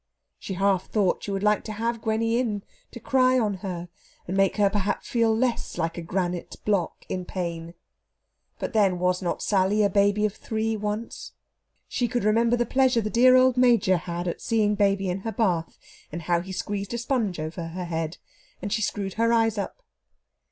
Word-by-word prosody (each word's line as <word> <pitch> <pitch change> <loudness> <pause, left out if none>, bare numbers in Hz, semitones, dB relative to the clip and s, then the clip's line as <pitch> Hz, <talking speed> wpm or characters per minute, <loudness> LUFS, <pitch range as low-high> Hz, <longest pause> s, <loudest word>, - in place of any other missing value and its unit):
She 190 - -5
half 195 -1 +1
thought 200 -4 +1
she - - -5
would 195 0 -2
like 210 0 +3
to 215 - -5
have 230 +1 -2
Gwenny 225 +2 +1
in, 210 -5 -2 0.3
to - - -10
cry 255 +1 +3
on 210 -5 0
her 180 -2 -5 0.4
and 185 - -2
make 195 +1 +2
her 205 -1 +4
perhaps 200 0 -1
feel 230 -2 +2
less 245 0 -1
like 165 0 -1
a 170 - -5
granite 175 0 -3
block 200 -5 -1
in 185 -1 -3
pain. 170 -2 -5 0.8
But, - - -4
then, 200 -5 +3
was 180 +1 +1
not 175 - -2
Sally 200 +1 +2
a 200 - +2
baby 205 +1 +3
of 210 - -1
three 220 0 -2
once? 210 +2 -5 0.5
She 245 - -1
could 245 -2 -1
remember 230 +3 +3
the 240 - +1
pleasure 260 -1 +3
the 215 0 -3
dear 255 +2 +6
old 255 0 +5
Major 235 -7 +4
had 175 +1 -4
at 170 - -3
seeing 215 -3 +2
baby 200 -1 +1
in 180 +1 -1
her 225 +3 -4
bath, 180 -7 0 0.3
and 170 +2 -6
how 170 +1 +1
he 190 +2 -8
squeezed 200 +3 -3
a - - -1
sponge 235 - -1
over 165 +2 -4
her 180 +2 -5
head, 165 -1 -3 0.4
and 200 +1 -3
she 220 - 0
screwed 200 -2 -2
her 230 +1 +2
eyes 225 -2 +3
up. 350 - -5
205 Hz, 195 wpm, -25 LUFS, 180-230 Hz, 0.8 s, dear